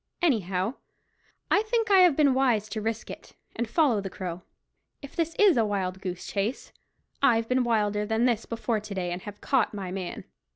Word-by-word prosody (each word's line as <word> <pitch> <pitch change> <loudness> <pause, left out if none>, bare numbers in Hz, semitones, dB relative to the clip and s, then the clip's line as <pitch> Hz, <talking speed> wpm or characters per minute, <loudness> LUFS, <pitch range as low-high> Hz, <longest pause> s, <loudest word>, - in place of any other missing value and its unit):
Anyhow, 200 - +1 0.8
I 405 - +5
think 450 0 0
I 390 - +7
have 355 -5 +6
been 285 -3 +4
wise 245 -6 +2
to 220 - -4
risk 220 0 -3
it, - - -11 0.2
and 235 -1 -2
follow 255 -7 +2
the 195 - -5
Crow. 180 -1 -6 0.6
If 280 - -10
this 330 -1 -1
is 405 -9 +5
a 230 - +4
wild 190 -3 -2
goose 180 -2 -5
chase, 210 +5 -3 0.5
I've 230 -4 +3
been 255 +1 +2
in - - +2
wilder 210 -3 +1
than 220 +3 +1
this 235 -3 0
before 230 -1 -1
to 210 -1 -8
day, 180 -2 -2
and 175 +1 -4
have 205 +1 -10
caught 255 -6 +1
my 190 -3 -5
man." 185 -2 -5
225 Hz, 200 wpm, -27 LUFS, 195-265 Hz, 0.8 s, I